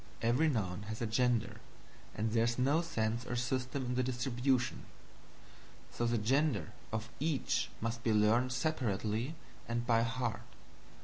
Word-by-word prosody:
Every 125 Hz, +8 st, +3 dB
noun 105 Hz, -6 st, -2 dB
has 110 Hz, -, -4 dB
a 115 Hz, -, -1 dB
gender, 120 Hz, 0 st, +1 dB, 0.5 s
and 110 Hz, +2 st, -1 dB
there 115 Hz, 0 st, +3 dB
is 120 Hz, 0 st, 0 dB
no 140 Hz, +6 st, +3 dB
sense 115 Hz, -8 st, -1 dB
or 120 Hz, -, -4 dB
system 130 Hz, +2 st, -1 dB
in 125 Hz, -, -1 dB
the 125 Hz, -, +2 dB
distribution; 125 Hz, 0 st, 0 dB, 1.1 s
so 120 Hz, -, -1 dB
the 120 Hz, 0 st, +2 dB
gender 120 Hz, -, +1 dB, 0.2 s
of 110 Hz, +1 st, -3 dB
each 150 Hz, -1 st, 0 dB
must 115 Hz, +1 st, -2 dB
be 115 Hz, -, +2 dB
learned 110 Hz, +4 st, +4 dB
separately 120 Hz, -2 st, -1 dB, 0.3 s
and 120 Hz, 0 st, -1 dB
by 115 Hz, -2 st, +4 dB
heart. 115 Hz, -2 st, -1 dB
120 Hz, 145 wpm, -34 LUFS, 110-130 Hz, 1.1 s, learned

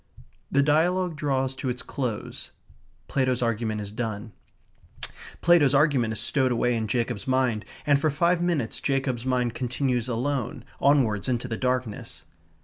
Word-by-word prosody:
The 140 Hz, 0 st, +4 dB
dialogue 170 Hz, +4 st, +2 dB
draws 135 Hz, -3 st, 0 dB
to 130 Hz, 0 st, -4 dB
its 125 Hz, -1 st, -4 dB
close. 125 Hz, -6 st, -4 dB, 0.6 s
Plato's 130 Hz, -2 st, +1 dB
argument 110 Hz, -2 st, -1 dB
is 100 Hz, -1 st, -6 dB
done. 110 Hz, -1 st, -4 dB, 1.1 s
Plato's 155 Hz, -5 st, +5 dB
argument 135 Hz, -6 st, +3 dB
is 110 Hz, -, -3 dB
stowed 130 Hz, -3 st, +1 dB
away 125 Hz, +1 st, +2 dB
in 110 Hz, -1 st, -1 dB
Jacob's 120 Hz, -2 st, -2 dB
mind, 130 Hz, -5 st, +1 dB, 0.2 s
and 145 Hz, -2 st, +3 dB
for 155 Hz, -, +3 dB
five 170 Hz, +4 st, +2 dB
minutes 165 Hz, -10 st, 0 dB
Jacob's 130 Hz, -3 st, -1 dB
mind 125 Hz, -2 st, +1 dB
continues 125 Hz, -1 st, -1 dB
alone, 125 Hz, +1 st, -2 dB
onwards, 130 Hz, -7 st, +3 dB
into 125 Hz, 0 st, -1 dB
the 115 Hz, -, -3 dB
darkness. 125 Hz, -2 st, -3 dB
130 Hz, 140 wpm, -26 LUFS, 115-140 Hz, 1.1 s, Plato's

